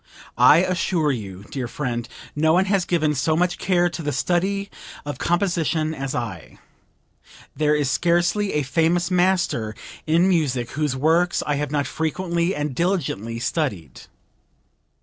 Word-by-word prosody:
I 130 +8 +6
assure 175 -4 0
you, 100 -6 -6
dear 130 -3 -3
friend, 120 -3 -4 0.3
no 160 +2 +3
one 185 +2 +3
has 195 -2 +1
given 155 -4 +1
so 155 +3 +1
much 180 +2 0
care 175 -2 +2
to 170 -1 -5
the 145 -2 -2
study 190 +8 -1 0.3
of 145 - -5
composition 170 -3 0
as 135 -3 -4
I. 110 -10 -5 1.0
There 150 0 +2
is 145 -3 0
scarcely 175 +4 +1
a 150 - +1
famous 165 +6 +1
master 175 - +1 0.3
in 170 +4 +4
music 140 -10 0
whose 150 -2 -1
works 165 +6 +2
I 145 -1 0
have 145 -1 -2
not 145 -1 0
frequently 170 +2 -1
and 150 -1 -2
diligently 130 - -1
studied." 115 - -3
155 Hz, 145 wpm, -22 LUFS, 135-175 Hz, 1.0 s, I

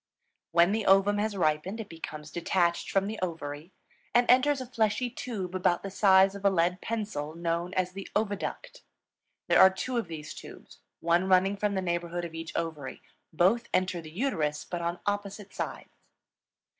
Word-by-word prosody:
When 170 +2 +5
the 215 0 -1
ovum 195 +2 +5
has 210 -1 -1
ripened, 170 +5 0
it 220 - -5
becomes 155 -3 -8
detached 170 +1 0
from 195 0 +2
the 215 +2 -4
ovary, 160 -2 -5 0.4
and 240 0 +6
enters 270 +3 +4
a 255 - -5
fleshy 235 0 0
tube 205 -8 -5
about 180 -2 +1
the 195 - -5
size 190 -1 +5
of 200 0 -9
a 200 - +5
lead 180 0 +1
pencil, 200 -10 -3
known 170 +1 -2
as 185 -1 0
the 195 +1 -8
oviduct. 205 -2 -3 0.7
There - - +4
are 190 - +10
two 240 +6 -3
of 230 - -1
these 155 -2 -7
tubes, - - -12 0.2
one 170 +3 +2
running 190 +2 +4
from 200 0 -1
the 190 - -1
neighborhood 175 0 -2
of 165 - -8
each 165 0 -6
ovary; 160 -5 -4 0.3
both 195 +9 +2
enter 185 -2 0
the 155 - -10
uterus, 155 - -1
but 175 -1 -4
on 170 +1 -2
opposite 205 0 -3
sides. - - -5
185 Hz, 175 wpm, -29 LUFS, 170-205 Hz, 0.7 s, are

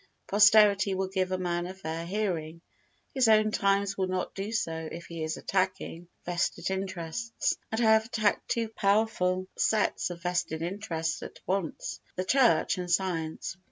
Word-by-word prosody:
Posterity 205 -1 +5
will 190 0 -1
give 185 -1 -1
a 185 - 0
man 175 -1 -2
a 185 - -7
fair 165 -2 -5
hearing; 170 -5 -2 0.5
his 260 -3 +3
own 215 -1 +5
times 200 0 +1
will 190 -1 0
not 185 0 -2
do 200 +2 -4
so 160 -7 -2
if 170 0 -7
he 165 -1 -7
is 155 +1 -2
attacking 185 -2 -2 0.2
vested 175 +2 -1
interests, 190 +3 -2 0.2
and 220 - -1
I 220 -2 +5
have 220 0 +3
attacked 220 -3 0
two 230 -1 0
powerful 200 -3 +1
sets 215 -4 +1
of 175 -1 -8
vested 175 -3 -1
interests 170 -3 -3
at - - -9
once. 190 -3 -2 0.2
[The 185 - -2
Church 250 -5 +3
and 180 -1 -4
Science. 175 -1 -1
190 Hz, 160 wpm, -29 LUFS, 175-210 Hz, 0.5 s, Posterity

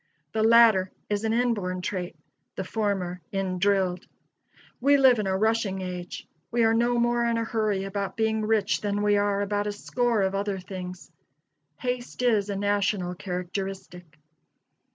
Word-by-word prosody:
The 220 - -1
latter 220 -4 +6 0.2
is 205 +1 0
an 220 - +1
inborn 215 -7 0
trait; 180 -2 -3 0.4
the 190 - -3
former 190 -3 -2
in 190 -2 -2
drilled. 190 -2 +1 0.7
We 280 +3 +5
live 260 -4 +5
in 205 - -1
a 190 0 +1
rushing 215 -2 0
age. 180 -1 -6 0.2
We 235 0 +1
are 225 0 +4
no 240 +1 +2
more 240 0 +2
in 230 0 +1
a 230 - 0
hurry 215 -4 -1
about 200 +2 -4
being 220 -1 +1
rich 215 -2 +1
than 205 0 -1
we 205 0 +3
are 205 0 +1
about 205 0 -1
a - - -1
score 230 +1 0
of 190 0 0
other 200 0 -1
things. 185 -1 -8 0.7
Haste 250 -1 -4
is 215 -4 +2
a 200 - -2
national 200 -2 0
characteristic. 180 -2 -6
205 Hz, 160 wpm, -26 LUFS, 190-225 Hz, 0.7 s, latter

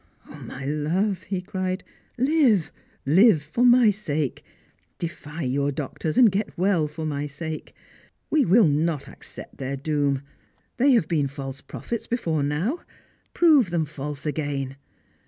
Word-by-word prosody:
" - - -37
O - - -12
my 135 - -8
love," 170 +7 0
he 190 -2 -1
cried, 185 -1 -3 0.2
" - - -40
live, 255 - +3 0.3
live 170 - +5
for 160 +11 -1
my 245 -3 +6
sake! 155 - -3 0.5
Defy 165 -2 -6
your 140 +2 0
doctors, 150 +2 -4
and 235 -5 +7
get 195 0 -2
well 180 -4 +2
for 155 +2 -6
my 145 -1 -2
sake! 155 +2 -7 0.6
We 305 -2 +4
will 215 -2 +5
not 150 0 0
accept - - -11
their 135 +1 -3
doom. 145 -1 0 0.5
They 270 +2 +5
have 225 -10 +3
been 155 -5 +1
false 135 -1 -7
prophets 235 - -6
before 165 -11 -1
now; 160 - -1 0.6
prove 300 - +5
them 170 -2 0
false 145 0 -7
again. 145 -3 -2
160 Hz, 150 wpm, -24 LUFS, 145-205 Hz, 0.6 s, and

